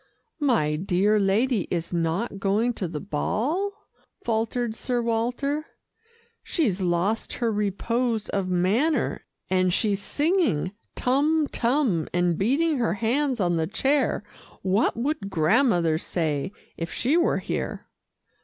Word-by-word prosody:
"My 225 - +2
dear 195 +4 +2
lady 210 +2 +2
is 170 0 -3
not 175 +6 -1
going 210 +5 +1
to 190 - -3
the 155 -2 -5
ball," 315 - -2 0.4
faltered 225 0 -1
Sir 245 +1 -1
Walter 245 +6 -1 0.7
"she's 215 - 0
lost 180 +5 0
her 235 -2 0
repose 220 +3 -1
of 195 -2 -1
manner, 200 - +1 0.2
and 185 -1 +2
she's 200 +1 +1
singing, 295 - +1 0.2
'Tum 295 +5 +2
Tum,' 235 - +1
and 175 -1 +2
beating 285 - +1
her 225 -6 +1
hands 250 +4 0
on 175 -3 +1
the 160 -1 0
chair 270 +4 +1 0.4
what 195 +4 +2
would 255 -4 -2
Grandmother 175 - +3
say, 160 -1 -2 0.3
if 165 0 -4
she 265 +6 +1
were 345 0 +3
here?" - - -4
220 Hz, 125 wpm, -25 LUFS, 180-255 Hz, 0.7 s, Grandmother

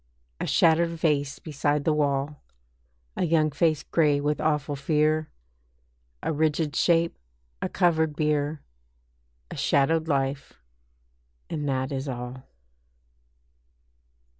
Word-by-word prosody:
A - - -2
shattered 165 +1 +4
vase 150 -4 0
beside 145 -1 -1
the 155 - +3
wall; 145 0 -1 0.7
A - - -1
young 155 -2 +2
face 155 0 +1
grey 150 -3 +2
with 150 +1 -1
awful 150 -2 0
fear, 155 +2 +1 0.9
A - - 0
rigid 155 0 0
shape, 170 -1 +2 0.5
a - - -1
covered 160 -3 +2
bier, 150 -1 0 0.9
A - - -5
shadowed 160 +3 +2
life, 135 -1 -1 1.0
and 150 -3 -2
that 130 0 -1
is 135 0 -3
all. 125 0 -6
150 Hz, 110 wpm, -26 LUFS, 140-160 Hz, 1.0 s, shattered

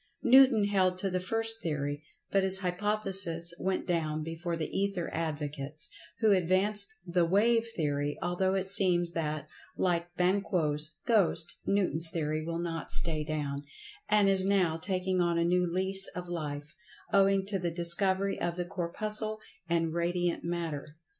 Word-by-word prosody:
Newton 255 -3 +6
held 190 -3 +1
to 195 +1 -1
the 185 - -1
first 225 +4 0
theory, 145 -2 -3 0.3
but 195 - +3
his 190 0 +2
hypothesis 190 -3 0
went 190 0 -2
down 155 -3 -1
before 165 +2 -4
the 160 -2 -5
Ether 195 -3 -2
advocates, 150 -2 -3 0.3
who 220 -2 +4
advanced 200 +4 +3
the 175 0 +1
"wave 225 +6 +2
theory," 145 -2 -2
although 185 +2 -1
it 190 -1 -1
seems 180 -3 +4
that, 155 -3 -3 0.3
like 175 -1 -1
Banquo's 180 -5 +1
ghost, 195 -8 +2
Newton's 175 -5 +3
theory 155 -1 -2
will 165 +1 -4
not 165 -1 -5
stay 160 -3 +4
down, 145 -2 -4 0.5
and 210 -1 +4
is 195 -1 +3
now 190 -4 +1
taking 185 +2 -1
on 170 -1 +1
a 170 - +1
new 180 +1 +1
lease 190 +2 0
of 180 0 -6
life, 150 -4 -5 0.4
owing 195 0 +3
to 195 -1 -2
the 175 -1 -2
discovery 190 +3 +1
of 175 0 -2
the 175 0 -3
Corpuscle 215 +5 -1 0.3
and 165 -1 0
Radiant 175 +1 -1
Matter. 170 -4 -4
175 Hz, 150 wpm, -29 LUFS, 165-195 Hz, 0.5 s, Newton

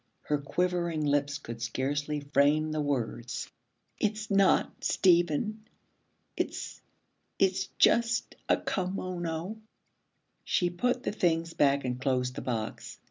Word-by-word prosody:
Her 150 -1 0
quivering 170 +1 0
lips 145 0 +1
could 115 -5 -8
scarcely 145 +5 -1
frame 145 +2 +2
the 155 0 -1
words. 125 -4 -3 0.5
'It's 215 0 -1
not 195 -1 +3
Stephen. 185 +4 +2 0.7
It's - - -4 0.6
it's 190 0 +2
just 235 0 +3 0.2
a - - +5
kimono.' 180 0 -3 0.9
She 175 -1 +1
put 245 +8 0
the - - -1
things 165 -4 0
back 140 -1 +3
and 125 0 -3
closed 125 -2 0
the - - -5
box. 115 -4 -4
155 Hz, 115 wpm, -29 LUFS, 140-185 Hz, 0.9 s, a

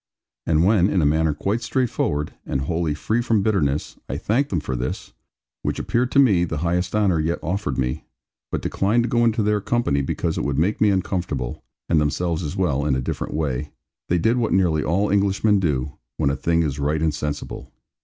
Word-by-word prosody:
And 80 +1 +3
when, 100 -2 +4
in 95 - +1
a - - +3
manner 80 +2 +2
quite 100 +10 -1
straightforward, 90 - -1
and 65 - -2
wholly 80 +1 -1
free 110 +10 0
from 115 -4 +1
bitterness, 75 -10 0
I - - -2
thanked 135 +7 0
them 90 - 0
for 65 -3 -4
this 60 +1 -4 0.5
(which - - -2
appeared 125 +1 0
to - - +2
me 105 -11 +5
the 80 -2 -2
highest 90 +3 0
honour 100 -6 +2
yet 80 +2 0
offered 85 -5 -2
me), 65 -1 -2 0.5
but - - -2
declined 110 +5 +1
to 120 - -2
go 120 0 +2
into 115 -1 +2
their 105 0 +1
company 100 -12 +1
because 70 - -2
it - - -2
would 70 -1 -1
make 90 +8 +1
me 105 - +5
uncomfortable, 90 -9 -2 0.2
and 80 -3 +3
themselves 85 +3 0
as 75 -4 -4
well, 75 -7 +1
in 70 -2 +1
a - - 0
different 65 - -4
way, 75 -2 -2 0.4
they 90 - +3
did 110 +8 +2
what 120 -2 0
nearly 85 -6 +2
all 95 +7 +1
Englishmen 100 +1 +3
do, 70 -7 -1 0.2
when 70 -3 +2
a - - -1
thing 85 +2 +1
is 75 -2 -2
right 75 +2 0
and 80 -2 +2
sensible. 75 0 -5
85 Hz, 205 wpm, -22 LUFS, 75-105 Hz, 0.5 s, me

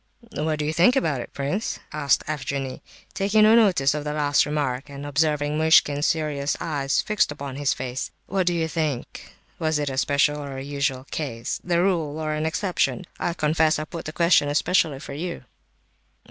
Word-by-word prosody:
"What 155 0 -1
do 150 - -2
you 155 - -1
think 175 +10 +4
about 155 - 0
it, - - -9
prince?" 145 +10 -2 0.2
asked 150 -2 +2
Evgenie, 140 -3 -3 0.3
taking 205 +2 +3
no 215 +1 +7
notice 180 -12 +4
of 150 -1 -3
the 150 0 -3
last 145 -1 +2
remark, 140 -3 -2
and 140 0 -8
observing 150 0 0
Muishkin's 150 -2 +4
serious 150 -3 -1
eyes 140 -4 0
fixed 210 -7 +1
upon 140 -2 -6
his 145 -1 +1
face. 125 0 -4 0.2
"What 190 -2 -1
do 175 - +3
you 165 -1 0
think—was 155 +1 -3
it 145 -2 -1
a 130 - -1
special 145 +1 +2
or 140 -2 -6
a 135 - -5
usual 140 -2 -2
case—the 145 +5 -2
rule, 170 -5 0
or 155 -1 -2
an 155 +1 -1
exception? 185 +2 -1
I 170 - -1
confess 155 0 +2
I 155 - -3
put 170 +1 -8
the 155 - -4
question 170 -3 +3
especially 155 0 +2
for 140 - -8
you." 170 +2 -5
150 Hz, 180 wpm, -24 LUFS, 140-165 Hz, 0.3 s, no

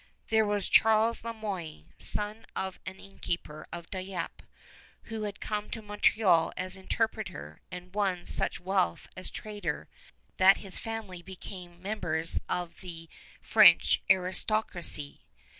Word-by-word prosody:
There 220 -1 +4
was 205 -1 0
Charles 225 +1 +4
Le 230 - -3
Moyne, 185 - -6
son 210 +2 -2
of 190 -1 -3
an 190 - -5
innkeeper 170 -5 -5
of 170 -1 -7
Dieppe, 185 -2 -5 0.6
who 220 -2 -4
had 205 -1 -5
come 210 -1 -3
to 225 - -5
Montreal 205 -4 +3
as 185 +1 0
interpreter 190 - -3
and 180 0 -9
won 190 -4 0
such - - 0
wealth 185 0 0
as 185 - -5
trader 210 -1 -4 0.5
that 190 +1 +7
his 195 -2 -8
family 220 -6 -5
became 180 -1 -10
members 165 -6 +1
of 175 -1 -3
the 165 -3 -8 0.3
French 215 -6 +6
aristocracy. 185 -4 +1
190 Hz, 125 wpm, -30 LUFS, 175-210 Hz, 0.6 s, that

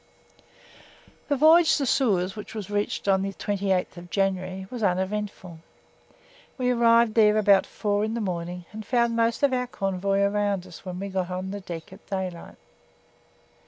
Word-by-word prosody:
The 285 - +1
voyage 320 +4 +6
to 280 - -1
Suez 195 -8 +1
(which 210 +1 -9
was 205 -2 -6
reached 205 0 -2
on 190 -1 +3
the 195 0 -3
28th 190 -3 -2
January) 190 0 -1
was 245 -2 -5
uneventful. 190 -2 -2 1.0
We 250 -1 +1
arrived 235 -2 +4
there 215 -1 +5
about 200 -2 +4
4 205 0 -1
in 220 +1 -2
the - - -2
morning 180 -3 -4
and 220 +1 -7
found 235 +1 +1
most 230 +2 +1
of 280 -2 +4
our 250 -1 0
convoy 195 -2 -1
around 200 -2 0
us 180 -3 -12
when 180 -1 -6
we 200 +1 -4
got 185 -2 -2
on 185 +1 -4
deck 180 -4 -7
at 195 - -16
daylight. 185 -3 -5
200 Hz, 160 wpm, -25 LUFS, 185-225 Hz, 1.0 s, voyage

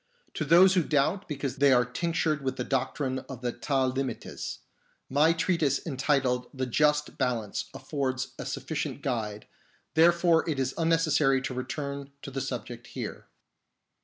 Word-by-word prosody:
To 155 - -2
those 180 +5 +7
who 185 - +4
doubt 155 +6 +1
because 140 -3 -3
they 140 0 +5
are 125 -1 +5
tinctured 155 +3 -1
with 130 -1 -2
the - - -2
doctrine 130 0 -1
of 130 -3 -7
the 120 -1 -1
Ta'limites, 130 0 -2 0.5
my 150 +4 +5
treatise 165 -4 +1
entitled 130 -4 0
The 130 -1 -2
Just 150 +4 +1
Balance 120 -6 -1
affords 130 -1 -3
a - - -4
sufficient 140 0 -4
guide; 110 -5 -2 0.5
therefore 170 +1 +4
it 150 - -1
is 130 0 0
unnecessary 155 -4 +3
to 130 - -3
return 140 +2 -4
to 140 - -6
the 135 0 -3
subject 120 -2 -5
here. - - -6
135 Hz, 145 wpm, -28 LUFS, 130-155 Hz, 0.5 s, those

